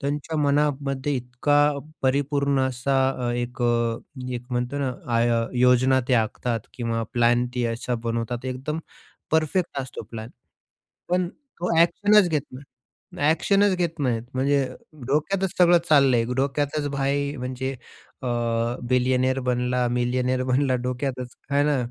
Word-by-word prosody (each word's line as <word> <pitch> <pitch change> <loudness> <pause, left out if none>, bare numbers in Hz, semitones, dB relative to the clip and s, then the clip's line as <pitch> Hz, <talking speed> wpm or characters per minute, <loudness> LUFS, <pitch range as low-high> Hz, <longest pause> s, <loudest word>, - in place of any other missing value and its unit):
त्यांच्या 145 +3 -3
मनामध्ये 145 -1 +1
इतका 125 +4 0 0.5
परिपूर्ण 140 +1 +1
असा 130 -1 0
एक 120 0 -3
अ, 120 -1 +1 0.4
एक 120 -1 -4
म्हणतोना 125 +2 -1 0.2
आय 120 +1 +3 0.3
योजना 125 +1 +4
ते 130 - +4
आखतात 115 +1 0
किंवा 115 -2 -2
प्लॅन 120 0 +3
ते 125 -1 0
असा 120 +2 -3
बनवतात 115 +1 -2
एकदम 130 +4 -3 0.5
परफेक्ट 160 +1 +1
असतो 130 -2 -6
प्लॅन. 110 0 -7 0.8
पण 180 0 +1
तो 180 - -4
एक्शनच 205 +4 +4
घेत 155 -3 +1
नाही 130 +2 -10 0.5
ना 145 - +2
एक्शनच 195 +4 +3
घेत 170 -2 -2
नाहीत 120 -5 0
म्हणजे 135 +1 +2 0.4
डोक्यातच 180 +7 0
सगळं 175 -1 +6
चाललंय 135 -6 +5
डोक्यातच 145 +2 0
भाई 140 +1 -1
म्हणजे 130 0 -3 0.5
अ, 130 - -3 0.6
बिलियनेअर 130 +1 +2
बनला, 125 0 0
मिलियनेयर 125 +1 0
बनला 130 +1 +2
डोक्यातच, 125 0 -3 0.2
आहे 140 0 +3
ना? 145 -1 +2
130 Hz, 125 wpm, -24 LUFS, 125-145 Hz, 0.8 s, सगळं